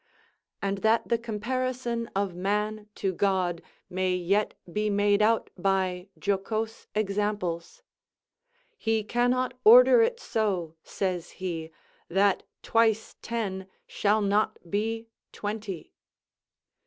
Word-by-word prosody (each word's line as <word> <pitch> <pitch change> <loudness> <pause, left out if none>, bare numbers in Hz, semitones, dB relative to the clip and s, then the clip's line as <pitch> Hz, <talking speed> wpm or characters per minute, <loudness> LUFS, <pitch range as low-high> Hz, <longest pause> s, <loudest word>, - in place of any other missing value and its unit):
And 195 0 -1
that 220 +2 +2
the 235 - +2
comparison 235 +1 -2
of 195 -2 0
man 210 +3 -2
to 195 -2 -1
God 180 -3 +1 0.3
may 185 0 0
yet 195 +4 +1 0.2
be 210 0 0
made 205 0 +3
out 225 +1 +2
by 185 -1 0
jocose 215 +3 -2
examples: 210 - -2 1.0
"He 225 -1 +1
cannot 245 +3 +1
order 485 +2 +9
it 470 +1 +1
so," 190 - -1
says 180 -3 -2
he, 165 -4 -4 0.4
"that 195 +2 +3 0.2
twice 225 -1 +2
ten 195 -5 -3 0.2
shall 210 +1 +1
not 210 +2 +1
be 225 +2 -1 0.3
twenty." 205 -5 -5
210 Hz, 105 wpm, -27 LUFS, 190-225 Hz, 1.0 s, order